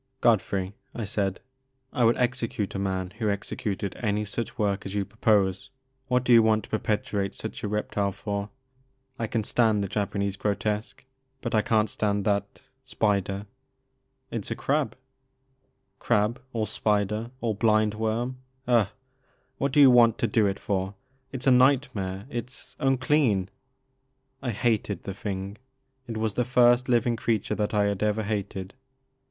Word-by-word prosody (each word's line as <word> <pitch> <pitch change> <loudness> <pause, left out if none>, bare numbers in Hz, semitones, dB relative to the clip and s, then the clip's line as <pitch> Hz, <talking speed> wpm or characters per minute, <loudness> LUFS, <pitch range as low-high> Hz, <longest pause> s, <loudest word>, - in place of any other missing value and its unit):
Godfrey," 100 -5 +2 0.2
I 115 - -3
said, 100 -1 -1 0.5
I 125 - +1
would 115 - +4
execute 120 -5 -1
a 95 - -3
man 95 -2 -2
who 110 -3 +1
executed 100 -1 -3
any 105 -2 -1
such 115 +4 -4
work 100 -3 0
as 95 +1 -6
you 100 -1 0
propose. 100 -1 +1 0.4
What 125 -1 +2
do 125 - +4
you 115 - +9
want 110 -1 +3
to - - -14
perpetuate 105 -2 -1
such 110 - -6
a - - 0
reptile 105 -1 -1
for? 100 0 -4 0.7
I 115 - -1
can 110 0 -1
stand 110 -2 +2
the - - -2
Japanese 100 0 -2
grotesque 105 +3 -2 0.3
but 120 - -4
I 110 - +4
can't 110 0 +2
stand 100 -1 -1
that 100 -1 -1
— 130 0 -47
spider 100 -2 0 0.3
— 130 0 -48
" 130 0 -46
It's 115 -4 -3
a - - -2
crab." 135 -4 0 1.0
Crab 105 +4 +1
or 115 -3 -1
spider 105 +1 0
or 115 -3 0
blind 110 0 +3
worm 115 +4 -2
— 130 -1 -40
^ugh 120 -5 +4
I - - -20 0.7
What 140 0 +1
do 145 - +3
you 135 -3 +9
want 120 -2 +6
to - - +1
do 110 -1 +3
it 100 0 -1
for? 95 0 -2 0.4
It 130 -2 -5
's - - -7
a 135 - +6
nightmare 125 -7 +2
— - - -20
^it 120 +1 -4
's 130 - -8
unclean! 130 -7 +2 0.5
" 135 0 -47
I 130 - -2
hated 110 -3 0
the 95 - -5
thing. 100 +1 -5 0.5
It 115 -2 -4
was 110 -1 -1
the 125 - +1
first 125 0 +4
living 120 -1 +3
creature 110 -2 0
that 105 0 -1
I 105 - +4
had 100 -1 -1
ever 105 +1 +1
hated. 100 -2 -3
110 Hz, 175 wpm, -27 LUFS, 100-120 Hz, 1.0 s, you